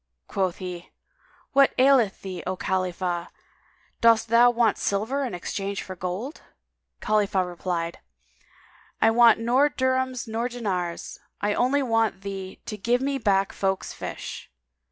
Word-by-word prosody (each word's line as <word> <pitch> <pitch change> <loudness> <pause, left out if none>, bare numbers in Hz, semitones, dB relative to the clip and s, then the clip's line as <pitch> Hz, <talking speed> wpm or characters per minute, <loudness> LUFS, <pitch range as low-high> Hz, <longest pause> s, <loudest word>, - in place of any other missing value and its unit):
Quoth 190 -3 -1
he, 180 -2 -7 0.6
"What 275 0 +5
aileth 255 -6 +4
thee, 185 -3 -5
O 185 - -1
Khalifah? 180 -2 -2 0.7
Dost 230 -1 +4
thou 235 +2 +6
want 235 -3 +2
silver 225 +8 -1
in 245 -9 -3
exchange 195 +3 -4
for 185 - -8
gold?" 185 - -5 0.6
Khalifah 200 -3 +1
replied, 175 -1 -3 1.0
"I 225 - +5
want 235 -1 +6
nor 250 +6 +3
dirhams 260 -2 -1
nor 230 +2 -2
dinars. 185 -8 -4 0.2
I 205 0 0
only 275 +5 +2
want 225 -5 +1
thee 195 -1 -6
to 210 - -5
give 235 +5 +1
me 275 0 -1
back 195 -3 +1
folk's 195 -1 -2
fish." - - -7
210 Hz, 135 wpm, -25 LUFS, 185-245 Hz, 1.0 s, thou